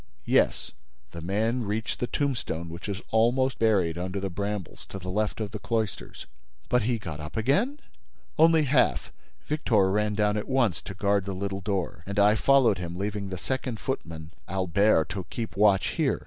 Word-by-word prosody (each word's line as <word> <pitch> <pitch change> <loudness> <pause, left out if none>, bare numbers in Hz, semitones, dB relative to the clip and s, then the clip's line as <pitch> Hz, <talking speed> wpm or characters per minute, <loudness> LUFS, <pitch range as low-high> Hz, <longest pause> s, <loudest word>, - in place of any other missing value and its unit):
"Yes. - - +2 0.4
The 85 - -7
man 110 +8 0
reached 110 +2 -3
the 125 - -1
tombstone 115 - -2
which 85 +5 -7
is 95 -2 -4
almost 120 +3 +2
buried 95 -7 +2
under 90 +2 -3
the 95 -1 -3
brambles, 100 -1 -4
to - - -7
the 90 -1 -5
left 105 +3 -1
of 105 -3 -3
the 105 - -5
cloisters." 110 -2 -3 0.4
"But 125 - +3
he 120 +2 0
got 80 -8 -7
up 75 +7 -7
again?" 195 - +1 0.6
"Only 160 0 +5
half. 140 -1 +2 0.3
Victor 110 -10 +2
ran 105 +1 +1
down 105 0 +2
at 105 - -4
once 120 -10 +2
to 95 - -7
guard 100 0 +1
the 100 -1 -4
little 100 +1 -3
door 95 -4 -2
and 100 +1 -4
I 105 +1 +6
followed 125 -4 +4
him, 85 -1 -5
leaving 100 0 -3
the 95 - -4
second 130 +2 -3
footman, 80 - -5 0.2
Albert, 95 -2 +2
to 95 -4 -5
keep 115 -2 -5
watch 100 -2 +4
here." - - 0
105 Hz, 180 wpm, -27 LUFS, 95-115 Hz, 0.6 s, I